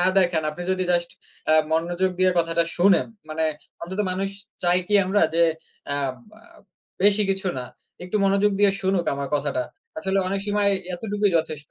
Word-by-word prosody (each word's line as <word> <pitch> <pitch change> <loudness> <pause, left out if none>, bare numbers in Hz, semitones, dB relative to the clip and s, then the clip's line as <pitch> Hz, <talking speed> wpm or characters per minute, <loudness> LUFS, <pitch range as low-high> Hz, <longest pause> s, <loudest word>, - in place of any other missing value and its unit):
না 180 - +4
দেখান। 175 -4 +2
আপনি 165 +4 -8
যদি 185 0 -1
জাস্ট 170 0 +1 0.4
এ্যা 155 - +4 0.2
মনোযোগ 175 +3 0
দিয়ে 185 0 +4
কথাটা 165 0 +2
শোনেন। 185 +2 +4 0.2
মানে 160 +1 -1 0.4
অন্তত 190 +4 -4
মানুষ 195 +2 -1 0.3
চাই 175 +1 +4
কি 210 - +1
আমরা? 195 +2 +1
যে, 170 0 +4 0.5
আম 135 -2 -1 0.2
এ - - -18 0.6
বেশি 205 +1 +7
কিছু 190 0 -1
না, 125 - -4 0.4
একটু 180 +4 -2
মনোযোগ 200 +1 +3
দিয়ে 205 - +6
শুনুক 190 -2 0
আমার 140 -1 -4
কথাটা। 140 -3 0 0.4
আসলে 195 -2 0
অনেক 195 +1 -1
সময় 205 -1 +2 0.2
এতটুকুই 205 +1 -1
যথেষ্ট। 155 -3 -5
185 Hz, 170 wpm, -23 LUFS, 165-195 Hz, 0.6 s, বেশি